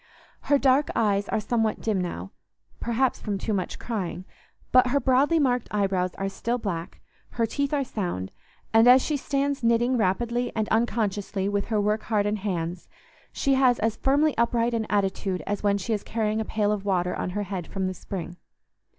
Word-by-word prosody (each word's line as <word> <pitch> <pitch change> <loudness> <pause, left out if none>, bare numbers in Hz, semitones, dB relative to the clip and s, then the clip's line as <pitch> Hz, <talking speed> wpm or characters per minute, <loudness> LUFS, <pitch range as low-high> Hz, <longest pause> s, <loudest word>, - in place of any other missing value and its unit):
Her 285 - +6
dark 270 +1 +3
eyes 205 -3 +1
are - - +1
somewhat 220 0 0
dim 210 -4 0
now—perhaps 225 - -3
from 205 -2 -2
too 215 +3 -2
much 185 -3 -2
crying—but 215 +4 -1
her 280 +3 +2
broadly 270 +5 +3
marked 250 -5 +1
eyebrows 190 -3 0
are 195 - -2
still 230 +5 -2
black, 175 -7 -5 0.4
her 230 - +3
teeth 280 +5 -2
are 290 -2 +1
sound, 175 - -4 0.4
and 225 +1 +6
as 255 +1 +7
she 305 - -1
stands 280 -1 -1
knitting 235 +2 +3
rapidly 235 +4 0
and 220 -1 0
unconsciously 205 -4 0
with 200 0 0
her 220 -2 0
work 210 +1 +1
hardened 210 -1 0
hands, 175 -3 -3 0.4
she 275 - +1
has 260 -2 +4
as 225 0 0
firmly 285 +5 +2
upright 235 0 +2
an 225 -2 -1
attitude 195 -2 -1
as 205 0 -2
when 200 -1 +2
she 200 +3 -2
is 210 - -1
carrying 220 0 -1
a - - -3
pail 210 -1 0
of 205 -2 -2
water 180 -3 0
on - - -3
her 205 - 0
head 185 -3 -5
from 195 -1 -3
the 185 - -1
spring. 180 -2 -7
215 Hz, 180 wpm, -26 LUFS, 195-245 Hz, 0.4 s, as